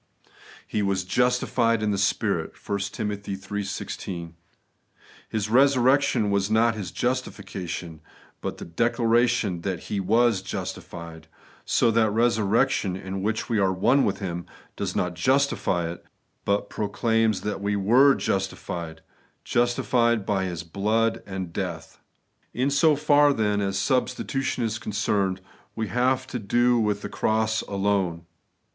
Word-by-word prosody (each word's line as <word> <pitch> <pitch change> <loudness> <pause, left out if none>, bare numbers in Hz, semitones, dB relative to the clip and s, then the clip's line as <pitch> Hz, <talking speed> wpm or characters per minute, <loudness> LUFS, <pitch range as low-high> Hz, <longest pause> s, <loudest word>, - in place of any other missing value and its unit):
' - - -22 0.2
He 105 - -1
was 100 -2 0
justified 120 +1 +1
in 105 - +1
the 100 - 0
Spirit' 100 - 0
(1 100 -1 -1
Tim. 105 -2 -3
iii. 100 0 -5
16). 85 -3 -5 1.0
His 105 -2 -2
resurrection 130 -2 +3
was 100 0 +1
not 115 +1 +3
His 105 -5 -5
justification, 90 -10 -4 0.4
but - - -4
the - - -8
declaration 115 -1 +1
that 95 -1 -3
He 100 - 0
was 110 +1 +3
'justified;* 85 -3 -7 0.4
so 115 - +3
that 110 -1 +3
resurrection, 110 -2 +2
in 95 +1 -5
which 110 +2 -1
we 115 -3 +1
are 95 -1 +3
one 120 +9 +3
with 100 - 0
Him, 85 -4 -5 0.3
does - - -3
not 90 -1 0
justify 95 -4 +1
us, 85 - -8 0.5
but 100 0 +1
proclaims 110 +1 0
that 105 -1 -3
we 100 0 0
were 125 +8 +5
justified, 85 -4 -3 0.2
— - - -40
justified 120 -2 +2
by 95 -2 0
His 85 -2 -4
blood 110 +6 0
and 95 -3 -5
death.^ - - -5 0.6
In 130 +3 +1
so 150 +2 +4
far, 145 0 +4
then, 105 -4 0
as 95 -1 -1
substitution 130 +2 -1
is 110 0 -2
concerned, 100 -4 -1 0.3
we 110 -2 -3
have 130 +4 +1
to 125 -1 -5
do 120 +3 +2
with 105 -2 0
the - - -3
cross 110 0 0
alone. 95 -4 -1
105 Hz, 140 wpm, -25 LUFS, 95-120 Hz, 1.0 s, were